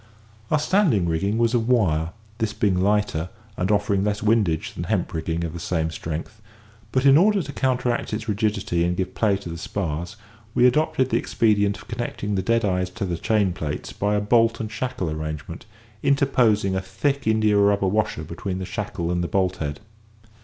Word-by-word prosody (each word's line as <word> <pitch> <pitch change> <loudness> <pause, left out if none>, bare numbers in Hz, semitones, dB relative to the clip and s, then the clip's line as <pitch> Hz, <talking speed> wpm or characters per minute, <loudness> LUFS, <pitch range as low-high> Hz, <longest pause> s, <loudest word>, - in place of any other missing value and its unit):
Our 155 - +3
standing 150 - +2
rigging 100 +6 0
was 115 0 +2
of 115 -2 +1
wire, 80 -10 +2 0.3
this 110 -2 -1
being 95 -4 +1
lighter, 100 -4 +1 0.3
and 95 0 -1
offering 100 -1 +2
less 105 0 -1
windage 105 -7 +1
than - - -5
hemp - - -1
rigging 80 +1 -2
of 80 -2 -4
the 85 - -6
same 80 -2 -1
strength; 85 +8 -6 0.5
but, 130 +1 +1
in 140 +2 +7
order 200 0 +3
to 140 0 -8
counteract 125 -2 0
its 110 +1 -4
rigidity 100 -5 0
and 90 +1 0
give 95 0 -2
play 105 -3 +2
to 95 -3 -8
the 85 0 -6
spars, 85 0 -3 0.4
we 125 - +5
adopted 130 -1 +2
the 115 - +3
expedient 105 -3 +1
of - - -14
connecting 105 -3 -3
the 95 - +1
deadeyes 95 -4 +1
to 105 - -2
the 90 -2 -2
chain 100 0 +1
plates 75 -5 -5
by 105 +1 0
a 105 - +1
bolt 115 +2 +3
and 110 -1 -4
shackle 110 -4 -3
arrangement, 80 +3 -6 0.3
interposing 120 -8 +2
a 95 - 0
thick 135 +9 -2
india 110 -1 +3
rubber 100 -1 +3
washer 105 -5 0
between 85 +4 -5
the 95 - -4
shackle 85 -1 -3
and 90 0 0
the - - -1
bolt 95 -1 0
head. 75 +2 -4
100 Hz, 190 wpm, -23 LUFS, 90-115 Hz, 0.5 s, in